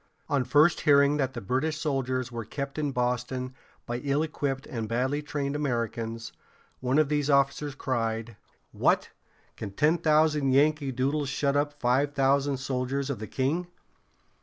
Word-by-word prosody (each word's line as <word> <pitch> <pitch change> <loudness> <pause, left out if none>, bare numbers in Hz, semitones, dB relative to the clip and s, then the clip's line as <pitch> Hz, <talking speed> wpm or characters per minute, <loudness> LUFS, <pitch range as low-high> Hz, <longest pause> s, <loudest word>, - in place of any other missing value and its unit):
On 140 -3 +2
first 150 +6 +4
hearing 140 0 +4
that 135 -2 -1
the 120 - -4
British 135 +9 -1
soldiers 130 -4 -1
were 115 -1 -4
kept 140 +6 -5
in 145 -2 0
Boston 125 +1 -2 0.3
by 120 - -3
ill 140 +2 0
equipped 140 -4 -3
and 115 -3 -5
badly 130 +5 0
trained 145 -1 -3
Americans, 115 -4 -2 0.5
one 130 +2 0
of 155 -1 +4
these 145 0 0
officers 140 0 +2
cried: 115 -3 -2 0.4
"What! - - +1 0.4
can 105 - -6
ten 150 - +2
thousand 150 -3 +3
Yankee 145 0 +3
Doodles 135 +3 -1
shut 140 +1 0
up 145 0 0
five 140 +4 +1
thousand 140 0 +2
soldiers 135 +1 -2
of 130 - -4
the 110 - -6
king? 155 +7 -1
140 Hz, 155 wpm, -27 LUFS, 125-145 Hz, 0.5 s, first